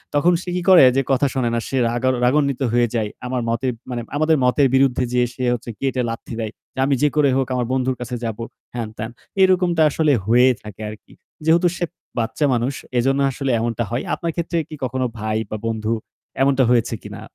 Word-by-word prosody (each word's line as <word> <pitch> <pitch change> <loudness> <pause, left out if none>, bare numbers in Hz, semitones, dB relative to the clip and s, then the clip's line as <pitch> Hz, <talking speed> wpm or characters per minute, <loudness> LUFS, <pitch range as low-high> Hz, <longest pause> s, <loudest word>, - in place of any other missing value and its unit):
তখন 175 +5 +4
সে 180 - -7
কি 180 - -1
করে, 180 -7 +9
যে 135 - +3
কথা 135 +2 +3
শোনে 125 -3 0
না। 115 - +1
সে 135 - -2
রাগা 120 +2 0 0.2
রাগান্বিত 140 0 +2
হয়ে 120 0 +3
যায়। 110 -2 0 0.2
আমার 125 -1 -1
মতের 125 +2 0 0.2
মানে 120 -1 -3 0.2
আমাদের 155 0 +3
মতের 135 +2 +4
বিরুদ্ধে 130 -2 +3
যেয়ে 125 0 +3
সে 130 - -5
হচ্ছে 120 0 -5
গেটে 130 -2 0
লাথি 115 0 -6
দেয় 110 -1 -3 0.2
যে - - -8
"আমি 140 -1 +2
যে 150 - +5
করে 145 -2 +4
হোক 135 - 0
আমার 125 -1 0
বন্ধুর 130 0 0
কাছে 125 0 -4
যাব," 110 -2 -3 0.4
হ্যাঁন-ত্যান। 110 -1 -5 0.3
এরকমটা 180 -3 +3
আসলে 150 0 +2
হয়েই 125 +3 +5
থাকে 105 0 -10
আরকি। 105 0 -12 0.3
যেহেতু 170 +2 +4
সে 175 - 0 0.3
বাচ্চা 125 +6 0
মানুষ 125 +3 0 0.2
এজন্য 135 +3 +2
আসলে 135 0 -2
এমনটা 115 0 -1
হয়। 120 - -1
আপনার 170 -1 -2
ক্ষেত্রে 170 0 -2
কি 155 - -7
কখনো 130 +1 -1
ভাই 110 0 -1
বা 110 - -3
বন্ধু 110 0 -1 0.5
এমনটা 135 -1 +4
হয়েছে 120 -1 +2
কিনা? - - -8
130 Hz, 200 wpm, -21 LUFS, 120-140 Hz, 0.5 s, করে